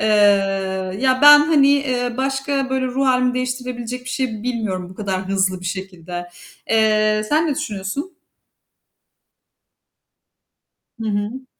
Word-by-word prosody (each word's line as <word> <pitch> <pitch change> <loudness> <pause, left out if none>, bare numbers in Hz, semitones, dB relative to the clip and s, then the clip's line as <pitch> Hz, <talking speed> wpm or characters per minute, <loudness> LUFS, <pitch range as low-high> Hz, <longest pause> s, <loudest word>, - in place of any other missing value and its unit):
Eee, - - 0 0.9
ya 260 -1 +2
ben, 295 0 +10
hani, 295 -2 +4
eee, 255 -4 0
başka 270 0 -1
böyle 265 -1 0
ruh 265 +2 -1
hâlimi 255 -1 +2
değiştirebilecek 250 -1 -4
bir 255 - -6
şey 235 -6 -3
bilmiyorum 215 -7 -3
bu - - -12
kadar 190 -2 -4
hızlı 190 -1 0
bir 180 - -7
şekilde. 180 -2 -6 0.4
Eee, 215 -1 +3
sen 310 +2 +2
ne 300 - 0
düşünüyorsun? 280 - -5 2.9
Hı 220 - -2
hı. 210 +6 -3
250 Hz, 125 wpm, -20 LUFS, 205-270 Hz, 2.9 s, ben